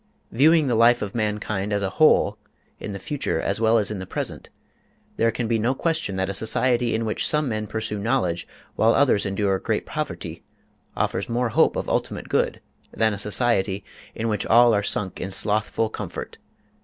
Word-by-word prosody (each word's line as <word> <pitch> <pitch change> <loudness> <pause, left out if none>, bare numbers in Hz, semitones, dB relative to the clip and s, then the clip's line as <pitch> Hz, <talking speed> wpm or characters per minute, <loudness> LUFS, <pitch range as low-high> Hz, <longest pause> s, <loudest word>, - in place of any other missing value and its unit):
Viewing 155 +5 +4
the 125 - 0
life 115 +1 +4
of 100 - -5
mankind 105 -2 -2
as 100 -1 0
a 95 - -1
whole, 155 - +4 0.4
in 105 - -6
the 100 - -5
future 135 +9 -3
as - - -1
well 115 +1 +4
as 105 -1 +1
in 105 - -4
the 95 - -7
present, - - -5 0.7
there 115 - +3
can 115 +1 -2
be 115 0 +1
no 120 +5 +1
question 160 - -1
that 95 0 -1
a 100 - -3
society 120 +3 +1
in 115 +1 -1
which 110 - -1
some 150 -1 +1
men 110 -3 -3
pursue 110 -1 -3
knowledge 100 -6 -1 0.3
while 115 +1 +3
others 125 -8 +3
endure 95 -1 0
great - - -2
poverty - - -5 0.6
offers 95 - -1
more 120 +1 0
hope - - +3
of - - -3
ultimate - - -2
good - - 0 0.3
than 110 -1 +1
a 100 - -5
society 105 -3 +1 0.3
in 115 - -2
which 105 -3 -1
all 120 +1 +6
are 105 - +2
sunk 100 -1 -3
in 95 - -3
slothful 110 +3 -1
comfort. - - -7
110 Hz, 190 wpm, -23 LUFS, 100-120 Hz, 0.7 s, all